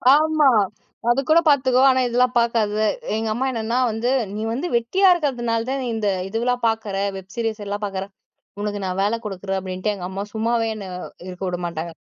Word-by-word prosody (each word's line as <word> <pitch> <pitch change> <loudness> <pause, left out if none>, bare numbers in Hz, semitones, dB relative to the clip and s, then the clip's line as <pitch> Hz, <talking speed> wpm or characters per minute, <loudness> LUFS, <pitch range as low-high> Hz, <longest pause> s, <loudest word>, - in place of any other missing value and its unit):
ஆமா. 310 -2 +4 0.6
அது 240 +3 +4
கூட 320 +2 +7
பாத்துக்கோ. 260 -2 +4
ஆனா 260 0 +3
இதெல்லாம் 245 +1 +2
பாக்காத, 230 -3 +1 0.4
எங்க 220 0 -1
அம்மா 250 +4 -1
என்னன்னா 230 0 -1
வந்து 225 +3 -1 0.3
நீ 215 - -3
வந்து 280 +9 -2
வெட்டியா 370 +13 +2
இருக்கறதுனாலதான் 260 -4 -1
இந்த 220 -2 -1 0.2
இதெல்லாம் 240 +4 -1
பாக்குற 220 -3 -1 0.2
வெப் 190 -1 -9
சீரிஸ் 225 -2 -2
எல்லாம் 205 +1 -4
பாக்குற. 195 -1 -3 0.6
உனக்கு 205 0 -2
நான் 185 0 -3
வேல 205 +3 +2
குடுக்குறேன் 195 -1 -3
அப்டின்ட்டு 185 +2 -2
எங்க 185 -3 -7
அம்மா 190 +1 -4
சும்மாவே 230 +1 +1
என்ன 205 -2 -7 0.4
இருக்க 180 +1 -8
விடமாட்டாங்க. 170 -2 -4
225 Hz, 165 wpm, -22 LUFS, 200-250 Hz, 0.6 s, கூட